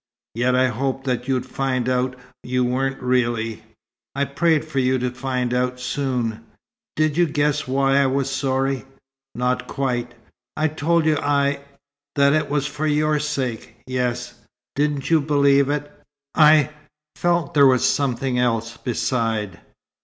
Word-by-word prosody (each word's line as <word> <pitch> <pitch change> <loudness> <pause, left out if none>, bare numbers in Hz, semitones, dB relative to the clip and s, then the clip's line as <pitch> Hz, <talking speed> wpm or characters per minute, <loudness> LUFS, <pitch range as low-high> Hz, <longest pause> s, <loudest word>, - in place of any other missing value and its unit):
"Yet 125 +2 +1
I 130 0 +4
hoped 135 +3 -2
that 125 -1 -2
you'd 130 -2 0
find 130 -2 -2
out 130 0 0 0.2
you 125 0 0
weren't, 135 +2 -1
really. 115 -3 0 0.5
I 140 0 +1
prayed 155 +2 +1
for 155 -3 -2
you 130 0 +2
to 125 0 -2
find 125 -1 -2
out 125 0 0
soon." 125 -4 -2 0.5
"Did 155 0 +1
you 175 -1 +4
guess 150 -1 0
why 135 +1 +2
I 140 - +3
was 135 0 0
sorry?" 135 0 -1 0.5
"Not 125 +1 -1
quite." 125 -3 -2 0.4
"I 155 0 +2
told 160 +2 +1
you 155 -1 +3
I 140 -1 +1 0.6
that 140 -1 +4
it 155 - +1
was 145 -1 0
for 150 +1 -3
your 150 0 +2
sake." 135 -6 -3
"Yes." 125 -1 -2 0.4
"Didn't 145 0 -1
you 160 -2 +5
believe 140 -1 +3
it?" 145 0 -2 0.4
"I 150 -3 +5 0.4
felt 175 -3 0
there 140 -2 +6
was 130 -1 +3
something 130 -1 0
else, 115 -1 0
beside." 115 -6 -2
135 Hz, 145 wpm, -22 LUFS, 125-145 Hz, 0.6 s, there